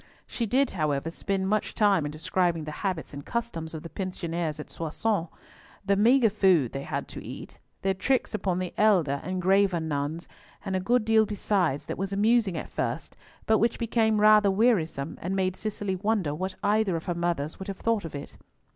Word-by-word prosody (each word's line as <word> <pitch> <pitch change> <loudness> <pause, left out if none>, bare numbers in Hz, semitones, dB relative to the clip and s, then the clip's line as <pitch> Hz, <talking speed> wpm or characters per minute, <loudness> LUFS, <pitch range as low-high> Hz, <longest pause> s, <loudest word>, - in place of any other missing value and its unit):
She 235 - -3
did, 260 +4 +2
however, 155 -2 -1
spend 190 +2 -2
much 215 +2 0
time 195 -8 +3
in - - -5
describing 165 +1 0
the 155 - -5
habits 185 -7 -3
and 140 0 -7
customs 170 -9 -4
of 155 - -7
the 165 - -7
pensioners 170 -4 -3
at 150 - -8
Soissons; 170 +3 -1 0.6
the 200 0 +3
maigre 230 +2 +4
food 185 - +3
they 135 - -4
had - - -4
to - - -8
eat; - - -9 0.2
their 195 0 +2
tricks 255 +8 0
upon 190 -4 -1
the 185 -1 -3
elder 175 -10 +3
and 185 0 -3
graver 190 0 +3
nuns, 155 +1 -3 0.4
and 190 -1 -2
a - - +1
good 235 +4 +1
deal 220 -1 +4
besides 195 -8 0
that - - -5
was 195 0 -2
amusing 210 -2 +2
at - - -6
first, - - -3 0.3
but 220 0 +3
which 230 +1 +1
became 225 -2 +1
rather 210 -1 +6
wearisome, 190 - +1
and 185 +3 -2
made 185 -1 0
Cicely 205 -2 -3
wonder 195 -5 0
what 185 +5 -4
either 205 -3 +2
of 165 - -4
her 175 - -1
mothers 170 -3 -2
would 190 - -7
have 195 -2 -5
thought 230 -2 0
of 165 -3 -7
it. 140 - -8
190 Hz, 195 wpm, -27 LUFS, 165-215 Hz, 0.6 s, rather